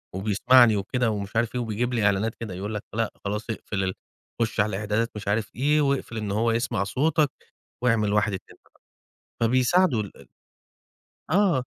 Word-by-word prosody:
وبيسمعني 110 +4 +5
وكده 115 +4 0
ومش 100 0 -5
عارف 115 +1 0
إيه 125 - 0
وبيجيب 120 +2 -2
لي 115 -4 +1
إعلانات 100 +3 +1
كده." 110 -5 -6
يقول 100 +4 -5
لك، 105 - -4
"لأ، 115 0 -1
خلاص 105 +3 -3
أقفل 105 -3 -3
ال 95 0 -1 0.5
خُش 115 -1 -1
على 105 +1 +3
الإعدادات 105 +3 -1
مش 105 -1 -7
عارف 105 0 -1
إيه، 150 +5 +2
واقفل 140 -5 -1
إن 105 -2 -3
هو 115 +3 +1
يسمع 115 -4 0
صوتك 145 +8 +1 0.5
وأعمل 110 -4 +2
واحد، 105 -1 +2
اتنين، 95 - -8
تلا" - - -30 0.7
فبيساعدوا 125 +3 +3
ال 100 - -10
ال - - -16 1.0
آه. 180 -6 +3
110 Hz, 175 wpm, -25 LUFS, 105-125 Hz, 1.0 s, وبيسمعني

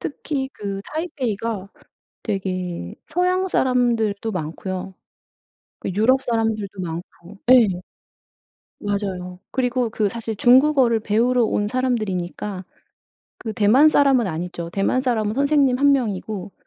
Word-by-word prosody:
특히 280 -2 -3
그 200 -1 -5
타이베이가 230 - -3 0.6
되게 185 - -3
서양 365 +3 +1
사람들도 230 - +1
많고요. 185 +3 -5 0.9
그 - - -3
유럽 255 +6 +3
사람들도 220 -5 -1
많고 170 +3 -8
예. 245 -5 +7 1.1
맞아요. 190 -3 -3
그리고 250 -2 0
그 215 -1 0
사실 225 +1 -4
중국어를 255 -2 +4
배우러 235 +4 +2
온 205 -1 0
사람들이니까 210 -6 -2 0.8
그 220 -3 -5
대만 235 +9 +5
사람은 275 -6 +4
아니죠. 170 0 -4
대만 195 +8 0
사람은 220 -5 0
선생님 280 -1 +2
1 280 +1 +5
명이고 210 -6 -2
220 Hz, 260 characters per minute, -22 LUFS, 195-255 Hz, 1.1 s, 예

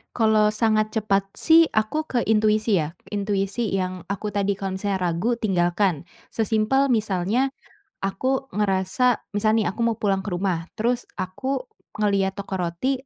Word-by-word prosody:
Kalau 215 -2 +4
sangat 215 0 +1
cepat 205 -3 +1
sih 325 +5 +4
aku 215 +9 0
ke 260 -5 -1
intuisi 215 0 +3
ya. 155 -3 0 0.2
Intuisi 200 +2 -1
yang 185 -2 -2
aku 200 +1 -3
tadi 200 -1 -1
kalau 195 -1 -3
misalnya 195 0 -2
ragu, 180 +7 0
tinggalkan. 180 -4 +1 0.2
Sesimpel 225 +5 +1
misalnya 215 +3 +1 0.5
aku 260 +8 -1
ngerasa 205 +4 +1 0.2
misal 215 +1 +2
nih 215 - +1
aku 235 +4 -2
mau 230 -1 0
pulang 195 -2 0
ke 205 - -5
rumah, 175 -2 -1 0.2
terus 240 +2 +1 0.2
aku 255 +8 -3 0.3
ngelihat 200 -2 +1
toko 195 -1 -4
roti, 190 +10 -2
210 Hz, 145 wpm, -24 LUFS, 190-225 Hz, 0.5 s, Kalau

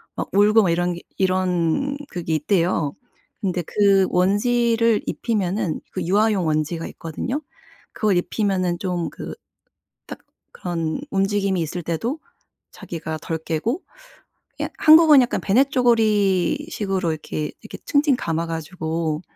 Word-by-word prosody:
막 - - -4
울고 210 +2 +5
막 185 - +2
이런 175 +1 0
게 175 - -8 0.2
이런 185 - 0
그게 165 -2 -2
있대요. 165 -2 +1 0.5
근데 180 -3 -1
그 195 +1 +3
원지를 230 +4 +2
입히면은 195 -6 -1
그 - - -3
유아용 205 0 +2
원지가 155 +2 -1
있거든요. 245 - -4 0.5
그걸 210 -4 +1
입히면은 185 -2 0
좀 180 -3 -2
그 - - -8 0.7
딱 - - -8 0.3
그런 165 +1 -3
움직임이 195 -2 +1
있을 170 +3 -4
때도 225 - -2 0.5
자기가 160 -2 -6
덜 165 - -3
깨고 165 - -2 0.8
그냥 - - -3
한국은 310 -2 +8
약간 245 - -1
배냇저고리 230 - +2
식으로 195 - -1
이렇게 155 -1 -4
이렇게 - - -9
칭칭 285 -2 +3
감아 165 -3 -2
가지고 160 -1 -3
185 Hz, 275 characters per minute, -22 LUFS, 165-220 Hz, 0.8 s, 한국은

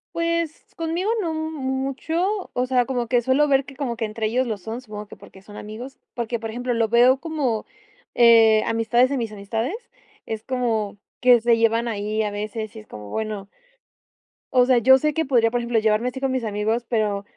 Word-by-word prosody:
Pues, 335 -1 -1
conmigo 335 +5 -2
no 330 -3 -2
mucho. 315 +5 -2
O 250 +1 0
sea, 250 -1 +2
como 245 -2 -2
que 245 0 +2
suelo 265 +5 +3
ver 275 -1 +3
que 275 0 -13
como 255 -5 -2
que 230 - -4
entre 220 +1 -3
ellos 250 +4 +1
lo 220 -3 -3
son, 225 +6 -6
supongo 210 -3 -8
que - - -12
porque 190 - -16
son 205 +1 -14
amigos. 230 +7 -8 0.2
Porque 235 0 -2
por 225 0 -6
ejemplo 245 +2 -2
lo 230 -1 +1
veo 245 +3 +5
como, 280 -9 -2 0.5
eh 225 -2 +6
amistades 230 +3 +2
de 280 - -1
mis 230 -3 -3
amistades, 220 - -3 0.5
es 220 0 -5
como 225 -6 -1 0.2
que 245 -1 +6
se 235 0 +3
llevan 230 +1 +2
ahí 215 0 -1
a 210 - -2
veces 215 +1 -5
y - - -7
es 215 - -15
como 105 -1 -10
bueno. 215 -3 -4 1.1
O 250 -1 +5
sea, 255 -2 +4
yo 265 +3 +7
sé 300 +3 0
que 320 - 0
podría 240 -4 +3
por 240 +1 -1
ejemplo 235 -1 +1
llevarme 220 +3 +1
así 265 - -7
con 270 0 0
mis 260 -2 -1
amigos, 220 +3 -1
pero 210 -4 0
235 Hz, 205 wpm, -23 LUFS, 220-265 Hz, 1.1 s, yo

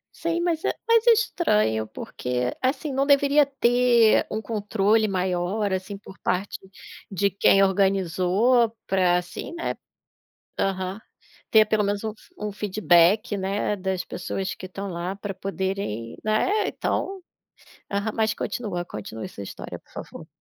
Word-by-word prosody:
Sim. 335 +1 -1
Mas 340 -2 0
é - - +2 0.2
mas 460 0 +4
é - - +10
estranho, 210 - +2
porque, 125 +2 -3
assim, 275 +2 -1
não 270 +1 +2
deveria 285 0 +5
ter 245 -4 +4
um 215 - -2
controle 215 0 +1
maior, 190 +2 -1
assim, 190 +2 -4
por 195 -1 -14
parte 185 +3 -2 0.5
de 200 0 +1
quem 195 0 +4
organizou 195 +4 +3 0.2
para, 180 -2 +3
assim, 180 - -6
né 335 - -2 0.9
Aham. 190 +1 -1 0.5
Ter 215 -1 +6
pelo 215 -1 +1
menos 200 0 -1
um 220 - -2
f 340 +11 -22
um 210 - -3
feedback, 205 +1 +3
né, 200 +2 -1
das 190 -1 -2
pessoas 190 +1 -4
que 185 - -8
estão 195 +2 -6
lá 175 +1 -4
para 200 -1 -6
poderem, 190 - -3
né, 215 - +1
então 390 -1 -2 0.7
Aham. 205 +2 -1
Mas 220 -1 +1
continua, 185 -8 -3
continue 110 - -7
essa - - -9
história, 100 - -7
por - - -29
favor. - - -9
200 Hz, 145 wpm, -25 LUFS, 185-225 Hz, 0.9 s, é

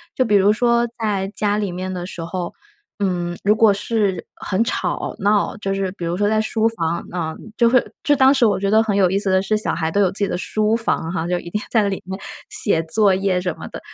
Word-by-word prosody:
就 255 - +2
比 210 -2 +2
如 200 +1 +5
说 235 +1 +2
在 200 -3 -1
家 205 -1 +2
里 205 -4 -2
面 185 +1 -4
的 180 0 -5
时 170 -3 -6
候， 175 +1 -4 0.5
嗯， 175 -3 -2
如 210 +2 +4
果 220 -2 +5
是 200 -3 -1
很 205 +3 -1
吵 240 - -2
闹， 205 +1 +1
就 195 -2 -3
是 195 -1 -2
比 180 - -9
如 170 +2 -2
说 205 0 +1
在 215 0 +2
书 220 +1 +1
房， 170 -6 -3
嗯， 160 -3 -3 0.2
就 235 -1 +4
会 255 0 +3 0.2
就 290 - +3
当 265 +1 +5
时 265 -3 +2
我 195 -2 +1
觉 200 +1 0
得 220 +1 +5
很 210 -3 -1
有 190 -2 +4
意 195 - +1
思 200 - -1
的 190 0 +4
是， 215 +2 0
小 210 - 0
孩 160 -1 -2
都 205 - +2
有 185 - +3
自 195 - -2
己 200 - +1
的 - - -2
书 215 +3 +1
房 170 -7 -1
哈， 170 -2 -2
就 180 0 0
一 170 - -8
定 210 - -2
在 220 -3 +3
那 200 - 0
里 195 - -4
面 190 +1 -5 0.3
写 165 -6 +2
作 195 +4 +3
业 190 -1 +1
什 180 -2 -3
么 - - -9
的。 - - -8
200 Hz, 275 characters per minute, -20 LUFS, 180-215 Hz, 0.5 s, 如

